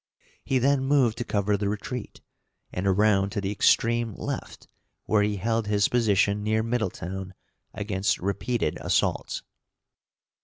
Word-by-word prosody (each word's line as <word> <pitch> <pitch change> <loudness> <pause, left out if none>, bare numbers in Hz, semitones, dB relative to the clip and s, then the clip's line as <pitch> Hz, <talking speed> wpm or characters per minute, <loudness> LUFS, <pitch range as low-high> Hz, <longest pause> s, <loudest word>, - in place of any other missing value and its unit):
He 135 - +1
then 135 +1 +2
moved 135 -5 +2
to - - 0
cover 105 -2 0
the 100 0 -1
retreat, 105 +3 -5 0.5
and 90 +2 -2
around 100 0 +3
to - - -1
the 100 0 -2
extreme 115 +1 +2
left, - - -6 0.4
where 105 -1 +3
he 105 0 +1
held 115 +2 -1
his 105 -1 +3
position 105 -3 +2
near 110 +1 +1
Middletown 95 -5 -3 0.4
against 100 -1 -1
repeated 100 0 -1
assaults. - - 0
105 Hz, 130 wpm, -26 LUFS, 100-115 Hz, 0.5 s, around